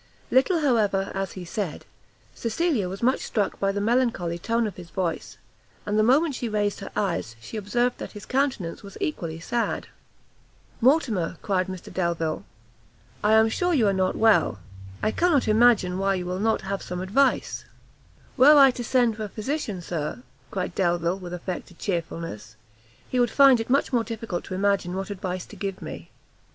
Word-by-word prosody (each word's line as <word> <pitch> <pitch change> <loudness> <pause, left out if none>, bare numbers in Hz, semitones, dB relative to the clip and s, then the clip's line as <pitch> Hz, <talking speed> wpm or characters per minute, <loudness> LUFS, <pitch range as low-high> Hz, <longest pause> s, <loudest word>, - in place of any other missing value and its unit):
Little, 320 +6 +3
however, 210 -8 +2
as 195 -2 -3
he 185 -2 -7
said, 175 -2 -4 0.5
Cecilia 235 - 0
was 195 +4 -7
much 255 +2 +3
struck 205 -3 -2
by 195 0 +1
the 200 - -2
melancholy 215 -7 +1
tone 230 +5 0
of 205 -4 -4
his 175 -2 -11
voice, 170 +1 -3 0.5
and 205 - -1
the 215 - +4
moment 280 +7 +4
she 245 -2 -3
raised 205 -1 0
her 195 - -7
eyes, 155 - -1
she 115 - -10
observed 240 +4 0
that - - -7
his 210 -2 -9
countenance 255 -10 -1
was 200 -1 -11
equally 175 - -3
sad. 235 +7 -2 1.0
"Mortimer," 230 - +2
cried 185 -3 0
Mr 185 -2 -8
Delvile, 170 -3 -1 0.8
"I 210 +1 +4
am 220 0 +6
sure 355 +10 +1
you 240 -6 +3
are 200 - +3
not 185 -1 +1
well; 220 - +3 0.5
I 215 - +2
cannot 335 -4 +2
imagine 215 -5 +4
why 195 0 +2
you 180 -1 -3
will 180 +1 -3
not 220 +2 +1
have 195 0 -3
some 180 0 -5
advice." 255 +9 +1 0.7
"Were 290 +3 +8
I 275 -2 +8
to 245 - -6
send 240 -2 +2
for 215 - -3
a - - -7
physician, 215 - -3
Sir," 165 +8 -4 0.3
cried 185 -2 -3
Delvile, 175 0 0
with 180 -2 -8
affected 180 0 -6
chearfulness, 165 - -4 0.5
"he 255 - -1
would 240 -1 +3
find 270 -1 +6
it 225 - -4
much 275 +1 +2
more 235 -2 +3
difficult 225 -5 -5
to 185 - -5
imagine 195 -2 +1
what 195 +2 -4
advice 185 -2 -4
to - - -13
give 195 -2 -4
me." - - -8
205 Hz, 180 wpm, -25 LUFS, 185-240 Hz, 1.0 s, Were